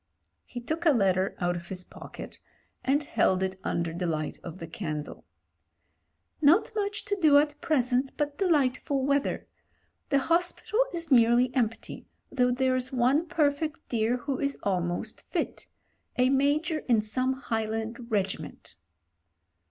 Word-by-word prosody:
He 245 - -7
took 315 +8 -2
a 305 - +7
letter 190 -4 +2
out 175 -1 0
of 170 0 -7
his 185 -1 -5
pocket - - -10 0.4
and 285 +3 +2
held 190 -8 +1
it 190 0 -3
under 170 -1 -1
the 175 +1 -2
light 155 -2 -3
of 170 0 -7
the 170 - -7
candle. 155 -3 -6 0.6
" - - -46
'Not 315 +8 +5
much 410 0 -2
to 410 0 0
do 300 -3 +7
at 295 0 +1
present, 265 -5 +1
but 295 -1 -1
delightful 280 -5 +1
weather. 280 0 0 0.6
The 280 - +3
hospital 345 - 0
is 335 -3 -5
nearly 240 0 +5
empty, 230 -3 -2 0.2
though 250 -2 +2
there's 255 0 0
one 265 +6 +2
perfect 305 -2 0
dear 230 +1 +1
who 265 +1 -3
is 280 -1 -1
almost 180 +2 -2
fit - - -3 0.2
— - - -45
a 255 +1 +4
Major 295 +4 +2
in 225 -3 +4
some 255 +5 0
Highland 225 -1 -3
regiment.' 195 - -3
255 Hz, 145 wpm, -28 LUFS, 215-290 Hz, 0.6 s, a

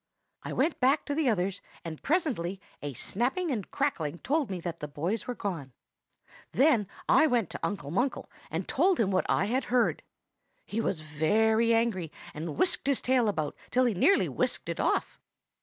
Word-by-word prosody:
I - - -6
went 320 - +1
back 270 +4 +3
to 290 - -2
the 295 -3 +2
others, 195 -2 0 0.2
and 160 -2 -6
presently 245 - 0 0.2
a 145 -1 -4
snapping 265 - -1
and 215 -7 -3
crackling 175 - -1
told 290 - 0
me 185 -2 -3
that 170 -1 -5
the 150 - -4
boys 165 +10 -3
were 250 - -3
gone. 165 - -4 0.8
Then 250 -7 +4 0.2
I 315 - +6
went 240 - +1
to - - -5
Uncle 145 -8 -3
Munkle 245 +10 0 0.2
and - - -3
told 375 -1 +2
him 205 -4 +2
what 185 - +1
I - - +3
had 250 +6 0
heard. 245 -1 +2 0.6
He 220 +2 -2
was 170 -7 -1
very 220 +10 +2
angry, 225 -8 +1 0.2
and 155 -1 -5
whisked 350 -6 +2
his 280 -2 +2
tail 250 -3 +3
about 155 -7 -2
till 255 +1 +3
he 240 - +2
nearly 390 - +4
whisked - - -1
it - - -3
off. - - 0
220 Hz, 180 wpm, -29 LUFS, 170-260 Hz, 0.8 s, I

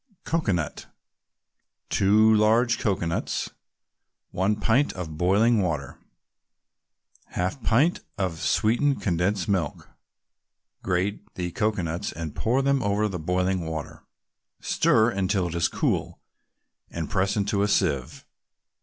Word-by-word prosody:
COCOANUT 95 - -1 1.0
2 110 +3 +4
large 115 +3 +3
cocoanuts 85 -5 -1 0.8
1 95 +3 +1
pint 115 +7 +2
of 85 -4 -6
boiling 105 +7 +3
water 75 -7 -3 1.4
1/2 95 +8 -2
pint 135 +11 +3
can - - -21
of 90 -5 -2
sweetened 120 +6 +2
condensed 90 +1 0
milk 95 -7 -2 0.9
Grate 95 +3 -1
the 90 -1 -3
cocoanuts 90 -3 -1
and 80 -2 -6
pour 120 +3 0
over 105 -6 +1
them - - -6
the 90 - -4
boiling 90 +1 -1
water. 80 -2 -6 0.6
Stir 115 +1 +3
until 95 -2 0
it - - -6
is 85 -1 +2
cool, - - -1 0.7
and 80 -2 -4
press 95 +2 0
in 100 -1 0
a 100 - +2
sieve. 70 -10 0
95 Hz, 115 wpm, -25 LUFS, 85-110 Hz, 1.4 s, 2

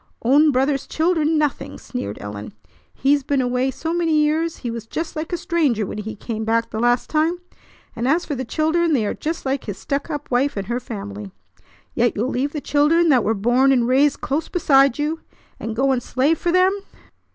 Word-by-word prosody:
"Own 285 +6 +5
brother's 270 +1 0
children, 320 -1 +1
nothing!" 295 -3 -1
sneered 105 -4 -6
Ellen. 105 0 -7 0.4
"He's 285 +2 +2
been 275 +1 0
away 250 +1 +1
so 320 +5 -4
many 340 -2 +1
years 310 +2 +1
he 235 - -1
was 230 -1 -7
just 325 +7 -4
like 315 +2 -4
a 350 - 0
stranger 320 - 0
when 210 - -6
he 215 +1 -5
came 220 +1 -5
back 230 +1 0
the 220 - -3
last 240 +1 +2
time, 320 +3 +1 0.6
and 235 +2 -2
as 330 +6 +2
for 295 - -3
the 260 -1 -3
children 320 +6 +1
they 235 -7 +2
are - - -1
just 325 0 -4
like 270 0 -1
his 205 -3 -5
stuck 280 +9 -3
up 295 -3 -5
wife 255 +1 +1
and 195 - -2
her 240 +4 -2
family. 100 - -7 0.6
Yet 240 0 +1
you'll 230 +5 -1
leave 275 +2 -1
the 300 - -4
children 315 +4 +3
that 255 -6 +4
were 220 +2 +1
born 245 +6 +3
and 245 -3 +2
raised 275 +3 +3
close 295 +4 -2
beside 275 -7 +4
you, 305 +2 -1 0.4
and 225 -1 -4
go 270 +3 +2
and 255 -2 +1
slave 275 +6 +1
for 345 - 0
them. 365 +2 +4
275 Hz, 210 wpm, -21 LUFS, 235-310 Hz, 0.6 s, Own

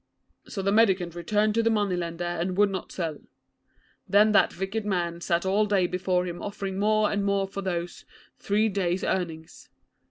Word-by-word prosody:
'So 195 - -5
the 195 - +1
mendicant 190 -6 +3
returned 210 +5 0
to 230 - +2
the 230 - +2
money 205 -4 +1
lender, 170 0 -4
and 175 +1 -2
would 205 -1 +4
not 190 -2 -5
sell. 160 -5 -4 0.9
Then 210 +2 +5
that 205 - +3
wicked 195 +4 -3
man 175 -4 -2
sat 170 +1 0
all 205 +3 +2
day 195 -3 +2
before 180 0 0
him 175 -1 -6
offering 195 -2 -4
more 215 0 +2
and 205 -1 0
more 200 -1 +1
for 195 +1 -6
those, 175 -2 -4 0.4
three 210 +2 +1
days' 185 -3 -1
earnings. 165 -3 -4
190 Hz, 180 wpm, -26 LUFS, 175-205 Hz, 0.9 s, Then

